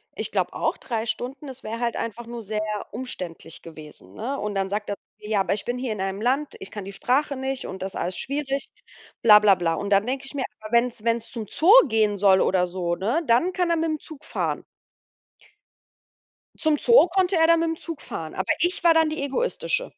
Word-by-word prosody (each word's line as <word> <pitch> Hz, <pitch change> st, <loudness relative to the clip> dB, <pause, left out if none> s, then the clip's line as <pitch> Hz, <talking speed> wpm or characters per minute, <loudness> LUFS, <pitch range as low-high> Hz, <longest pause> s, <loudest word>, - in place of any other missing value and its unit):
Ich -, -, -4 dB
glaube -, -, 0 dB
auch -, -, 0 dB
3 225 Hz, -3 st, -3 dB
Stunden, 260 Hz, +6 st, -4 dB
das 260 Hz, -1 st, -9 dB
wäre 225 Hz, +2 st, -5 dB
halt 235 Hz, -1 st, -1 dB
einfach 230 Hz, +1 st, -4 dB
nur 235 Hz, -1 st, -7 dB
sehr 215 Hz, +1 st, -2 dB, 0.3 s
umständlich 185 Hz, -9 st, -6 dB
gewesen, 150 Hz, -, -11 dB
ne? 270 Hz, -, -4 dB
Und 210 Hz, 0 st, -3 dB
dann 195 Hz, 0 st, 0 dB
sagt 205 Hz, +1 st, -3 dB
er 205 Hz, -, -1 dB
zu -, -, -75 dB, 0.2 s
mir: 210 Hz, -, -10 dB
„Ja, 210 Hz, -2 st, +2 dB
aber 190 Hz, 0 st, +1 dB
ich 205 Hz, -, -4 dB
bin 245 Hz, +1 st, -3 dB
hier 250 Hz, -3 st, -2 dB
in 195 Hz, -, -5 dB
einem 195 Hz, +1 st, -2 dB
Land, 270 Hz, +5 st, 0 dB
ich 190 Hz, -, -7 dB
kann 205 Hz, -2 st, -7 dB
die 195 Hz, -, -7 dB
Sprache 270 Hz, +7 st, 0 dB
nicht 265 Hz, 0 st, -3 dB
und 190 Hz, 0 st, -7 dB
das 195 Hz, 0 st, -4 dB
ist -, -, -5 dB
alles 180 Hz, +2 st, -2 dB
schwierig”, 275 Hz, 0 st, -3 dB, 0.5 s
bla 210 Hz, -2 st, +8 dB
bla 210 Hz, -2 st, +5 dB
bla. 170 Hz, -2 st, 0 dB
Und 200 Hz, +4 st, -4 dB
dann 200 Hz, +1 st, +4 dB
denke 265 Hz, +2 st, -3 dB
ich 270 Hz, -, -7 dB
mir, 265 Hz, -, -1 dB, 0.2 s
aber 215 Hz, +2 st, -10 dB
wenn's 235 Hz, -2 st, +2 dB
wenn's 230 Hz, 0 st, 0 dB
zum 225 Hz, -3 st, -5 dB
Zoo 345 Hz, +6 st, +3 dB, 0.2 s
gehen 215 Hz, -3 st, +2 dB
soll 190 Hz, -1 st, +5 dB
oder 180 Hz, -1 st, +2 dB
so, 175 Hz, -1 st, -2 dB
ne, 230 Hz, -, 0 dB
dann 280 Hz, +10 st, +3 dB
kann 360 Hz, -2 st, 0 dB
er 335 Hz, -, +2 dB
mit'm 315 Hz, -2 st, -1 dB
Zug 305 Hz, -3 st, -12 dB
fahren. -, -, -2 dB, 2.0 s
Zum 310 Hz, -2 st, +2 dB
Zoo 470 Hz, -, +6 dB
konnte 370 Hz, 0 st, +1 dB
er 325 Hz, -, +5 dB
dann 335 Hz, 0 st, +5 dB
mit'm 325 Hz, -1 st, -1 dB
Zug 330 Hz, -3 st, -7 dB
fahren, 160 Hz, -1 st, -6 dB
aber 190 Hz, 0 st, -1 dB
ich 350 Hz, +1 st, 0 dB
war 335 Hz, -1 st, +6 dB
dann 320 Hz, -1 st, +4 dB
die 310 Hz, -2 st, -3 dB
Egoistische. -, -, -1 dB
235 Hz, 230 wpm, -24 LUFS, 200-290 Hz, 2.0 s, bla